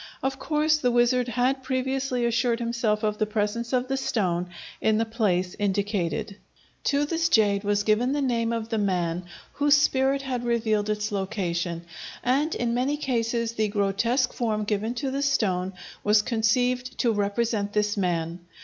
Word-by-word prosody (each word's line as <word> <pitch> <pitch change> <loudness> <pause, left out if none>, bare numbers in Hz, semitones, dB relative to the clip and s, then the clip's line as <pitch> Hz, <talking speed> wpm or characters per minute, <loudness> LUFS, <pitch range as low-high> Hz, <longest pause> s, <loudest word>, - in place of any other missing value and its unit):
Of 270 0 -1
course 305 +1 +2
the 250 - +2
wizard 240 +1 +3
had 250 +3 +1
previously 260 -1 -1
assured 235 0 +1
himself 230 -2 -1
of 210 -1 0
the 215 - +1
presence 215 +2 -2
of 255 -1 +1
the 270 +1 -1
stone 180 -9 -1 0.3
in 220 -1 +3
the 225 - +1
place 195 -5 0
indicated. 200 -2 -1 0.5
To 285 +1 +2
this 330 +2 0
jade 205 -6 +3
was 205 0 +1
given 225 +4 +2
the 290 - 0
name 230 -3 0
of 230 -1 -3
the 225 -2 0
man 180 -3 -1 0.3
whose 290 0 +4
spirit 275 -1 +2
had 255 -3 -3
revealed 220 -3 0
its 210 +1 -1
location, 180 -4 -2 0.4
and 280 +6 +1
in 235 -1 -1
many 260 +5 0
cases 235 -4 -1
the 220 -2 0
grotesque 210 +5 +1
form 215 -3 -1
given 215 +3 -1
to 265 +2 -2
the 275 +1 -2
stone 190 -10 +1 0.3
was 210 0 +4
conceived 250 +3 0
to 235 - +2
represent 205 0 -1
this 210 0 +1
man. 170 -3 -1
230 Hz, 165 wpm, -26 LUFS, 205-255 Hz, 0.5 s, whose